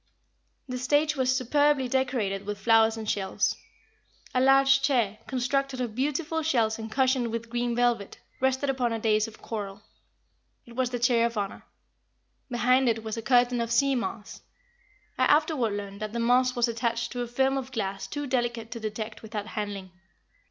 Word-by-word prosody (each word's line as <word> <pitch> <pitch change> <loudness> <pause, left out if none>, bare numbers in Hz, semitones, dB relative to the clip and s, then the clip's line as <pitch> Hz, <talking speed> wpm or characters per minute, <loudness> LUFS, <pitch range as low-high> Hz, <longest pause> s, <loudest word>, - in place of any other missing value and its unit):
The 250 -1 -4
stage 295 +4 +2
was 260 -1 +2
superbly 285 +1 +2
decorated 240 -7 -1
with 205 0 -3
flowers 225 +1 +4
and 220 -1 -6
shells. 195 -2 0 0.8
A 255 - +2
large 270 +1 +5
chair, 235 -7 +1
constructed 265 +1 -1
of 240 -4 -2
beautiful 295 +6 -1
shells 230 -8 +1
and 220 0 -6
cushioned 260 -1 +2
with 230 0 -5
green 240 0 -1
velvet, 240 -4 0 0.2
rested 265 +1 +1
upon 245 -3 -1
a - - -1
dais 215 -1 +2
of 220 - -14
coral. 205 -2 -5 0.8
It 235 - -14
was 255 -1 0
the 245 - -2
chair 235 -1 +3
of 235 -1 -7
honor. 200 -1 -4 0.8
Behind 250 +1 +3
it 225 -1 -1
was 220 -1 -4
a 225 - -4
curtain 245 +1 +3
of 230 0 -3
sea 275 +3 +3
moss. 230 -4 -4 0.8
I - - +5
afterward 295 -7 +2
learned 200 -1 -6
that 215 0 -4
the 235 - -2
moss 250 +2 +3
was 240 0 +2
attached 230 0 -2
to 245 - -3
a 240 - -3
film 265 +3 +1
of 265 -1 -4
glass 195 -5 -3
too 290 0 -4
delicate 240 -3 -2
to 230 - -5
detect 220 0 -5
without 215 -2 -5
handling. 205 -4 -5
240 Hz, 175 wpm, -27 LUFS, 220-260 Hz, 0.8 s, large